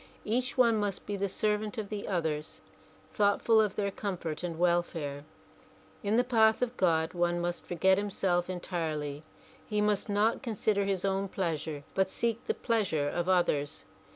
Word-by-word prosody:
Each 245 +4 -1
one 235 -3 +5
must 205 -2 -2
be 205 - -3
the 200 0 -1
servant 210 +3 -1
of 210 -2 -4
the 210 -1 -4
others, 160 -5 -2 0.5
thoughtful 210 +2 +4
of 210 -3 0
their 200 -1 -1
comfort 175 -7 -4
and 170 -2 -4
welfare. 165 -5 0 0.8
In 210 +2 +1
the 245 - +5
path 225 -2 +4
of 250 0 -2
God 165 -4 +2
one 175 0 +1
must 175 0 -3
forget 190 +2 +3
himself 185 -3 0
entirely. 155 -5 -3 0.5
He 210 -1 -1
must 210 0 +1
not 210 +3 +2
consider 215 -4 0
his 195 -1 0
own 195 0 0
pleasure 160 -6 -3
but 190 -1 +2
seek 235 +3 -1
the 445 - +1
pleas 225 -5 0
ure 145 -2 +1
of 175 +3 -2
others. 145 - +1
190 Hz, 165 wpm, -30 LUFS, 170-210 Hz, 0.8 s, one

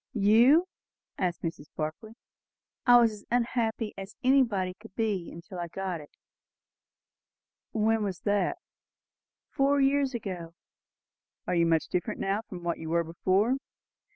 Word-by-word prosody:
"You!" 235 - +5 0.5
said 180 -2 +1
Mrs. 165 -3 -4
Barclay. 155 +8 -4 0.7
"I 245 0 +9
was 230 -2 +4
as 210 -1 -11
unhappy 230 -2 0
as 195 +2 -8
anybody 235 -9 +3
could 210 +1 -16
be 200 -7 -2
till 185 -4 -7
I 175 - -3
got 185 -1 -4
it." 145 - -14 1.6
"When 220 0 +2
was 195 -4 -3
that?" 205 - +1 0.9
"Four 280 +1 +2
years 275 -1 +2
ago." 180 -7 -5 0.9
"Are - - -1
you 170 -1 +3
much 165 -1 +2
different 180 - -2
now 195 +2 0
from 185 -5 -10
what 170 -1 -2
you 160 - -6
were 170 +1 +2
before?" 190 +9 +1
205 Hz, 135 wpm, -28 LUFS, 175-230 Hz, 1.6 s, I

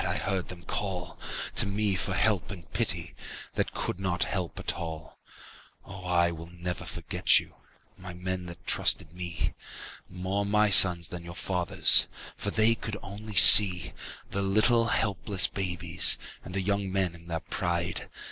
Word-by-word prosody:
I - - -2
heard 95 -2 -5
them 90 -1 -11
call 90 -4 -7 0.3
To - - +5
me 100 0 -3
for 95 +1 -3
help 105 -3 -1
and 90 -6 -11
pity - - -1 0.4
That - - -5
could 90 - -5
not 90 -2 -3
help 90 -4 -6
at - - -4
all. 80 -1 -10 0.7
Oh, 95 0 -12
never 85 -1 0
will 85 +2 -9
I - - -6
forget - - +1
you, - - -15 0.4
My 95 -1 -11
men 90 0 -6
that 85 - -13
trusted 80 - +3
me. 85 -2 -6 0.6
More 95 +2 -5
my 105 +1 0
sons 90 -3 +8
than 90 -1 -9
your 85 0 -12
fathers'. 90 -3 +3 0.3
For 100 - -6
they 110 +2 +1
could 110 -2 -8
only 105 +2 -11
see 95 -2 +8 0.4
The 100 - -4
little 110 +4 +1
helpless 100 -4 0
babies 90 -4 +1 0.3
And 90 - -11
the 95 - -3
young 100 0 -3
men 95 -2 -2
in 85 0 -15
their 80 -1 -5
pride. 85 0 -5
95 Hz, 160 wpm, -25 LUFS, 85-100 Hz, 0.7 s, sons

